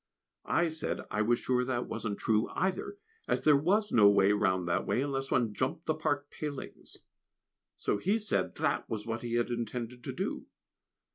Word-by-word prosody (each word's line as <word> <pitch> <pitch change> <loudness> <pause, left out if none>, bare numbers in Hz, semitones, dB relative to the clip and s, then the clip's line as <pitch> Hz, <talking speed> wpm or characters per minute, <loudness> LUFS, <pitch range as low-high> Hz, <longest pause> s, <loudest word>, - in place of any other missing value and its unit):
I 170 -1 +3
said 160 0 -3
I 105 - 0
was 120 +2 +3
sure 125 0 +1
that 125 -1 -1
wasn't 105 -3 -3
true 110 0 +1
either, 405 - -1 0.3
as - - 0
there 150 -1 +6
was 195 +9 +2
no 105 -3 +7
way 100 -1 +5
round 95 -3 +1
that 85 - 0
way, 130 - +1
unless 135 -1 -2
one 115 -4 +1
jumped 130 - -2
the 155 - +2
park 145 -2 -2
palings. 145 -3 -7 0.8
So 100 - -1
he 200 +5 +2
said 215 -1 -1
that 155 -2 0
was 110 -1 -3
what 115 0 -3
he 120 -1 -3
had 120 0 +1
intended 120 +1 -4
to - - -3
do. - - -4
125 Hz, 185 wpm, -31 LUFS, 110-155 Hz, 0.8 s, no